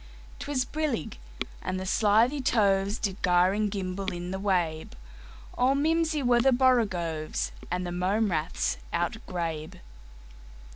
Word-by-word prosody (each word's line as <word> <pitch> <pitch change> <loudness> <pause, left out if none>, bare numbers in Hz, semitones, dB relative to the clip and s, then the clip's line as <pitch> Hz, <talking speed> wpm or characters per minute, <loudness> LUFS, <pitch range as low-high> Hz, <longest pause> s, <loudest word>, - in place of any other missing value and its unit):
'T 285 - -7
was 260 -3 0
brillig, 290 - -3 0.4
and 185 0 -3
the 190 - -5
slithy 225 +8 +3
tovesDid 200 -4 +1
gyre 180 +1 +4
and 210 0 0
gimble 195 -1 -3
in 175 +1 -5
the 190 - -3
wabe; 175 -5 -1 0.6
All 255 +2 +3
mimsy 315 0 +1
were 240 -1 +4
the 270 +2 +4
borogoves, 195 -12 +1 0.2
And 180 +1 -2
the 175 - -4
mome 190 +4 +1
raths 160 +1 -1
outgrabe. 170 -4 -3
195 Hz, 130 wpm, -28 LUFS, 180-245 Hz, 0.6 s, gyre